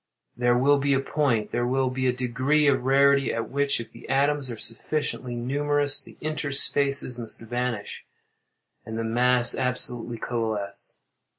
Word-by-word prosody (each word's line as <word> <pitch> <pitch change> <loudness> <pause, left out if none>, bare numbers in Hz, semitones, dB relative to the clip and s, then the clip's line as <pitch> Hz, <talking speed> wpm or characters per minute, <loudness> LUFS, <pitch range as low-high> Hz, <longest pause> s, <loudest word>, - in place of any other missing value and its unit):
There 120 0 +2
will 140 +3 +3
be 140 0 +1
a - - +2
point—there 120 -5 -1
will 130 0 0
be 130 0 -1
a - - +3
degree 130 +4 0
of 135 -3 +2
rarity, 140 0 +4
at 115 - -4
which, 140 -1 +1
if 115 - -8
the 115 - -14
atoms 140 0 +1
are 115 - -6
sufficiently 125 +2 -3
numerous, 145 +3 0
the - - -16
interspaces 140 -3 +2
must 115 -2 -2
vanish, 120 -2 -4 0.8
and 110 0 -7
the 115 - -2
mass 120 +1 +3
absolutely 125 -2 -2
coalesce. 110 -4 -4
130 Hz, 150 wpm, -25 LUFS, 120-140 Hz, 0.8 s, rarity